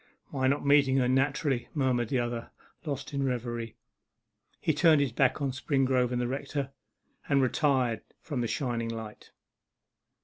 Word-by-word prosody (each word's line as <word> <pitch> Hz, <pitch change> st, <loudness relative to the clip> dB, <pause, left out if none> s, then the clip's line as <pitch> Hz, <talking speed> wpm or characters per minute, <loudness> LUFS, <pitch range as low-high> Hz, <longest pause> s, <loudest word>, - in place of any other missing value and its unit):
'My 130 Hz, -2 st, +1 dB
not 140 Hz, +2 st, +1 dB
meeting 140 Hz, -2 st, +5 dB
her, 125 Hz, -2 st, +3 dB
naturally,' 135 Hz, 0 st, +1 dB
murmured 125 Hz, -5 st, +1 dB
the 130 Hz, -, +1 dB
other, 120 Hz, -1 st, -2 dB, 0.4 s
lost 140 Hz, -2 st, -4 dB
in 140 Hz, -, -1 dB
reverie. 120 Hz, -3 st, -3 dB, 0.8 s
He 160 Hz, -, +1 dB
turned 155 Hz, 0 st, +5 dB
his 140 Hz, -4 st, +1 dB
back 135 Hz, +4 st, +1 dB
on 135 Hz, -, 0 dB
Springrove 130 Hz, -2 st, +1 dB
and 125 Hz, -, 0 dB
the 120 Hz, -, 0 dB
rector, 135 Hz, +1 st, -3 dB, 0.6 s
and 140 Hz, -1 st, +4 dB
retired 130 Hz, -3 st, +1 dB, 0.2 s
from 140 Hz, -6 st, -4 dB
the 120 Hz, -, 0 dB
shining 120 Hz, -3 st, -2 dB
light. 110 Hz, -2 st, -7 dB
130 Hz, 150 wpm, -29 LUFS, 120-140 Hz, 0.8 s, meeting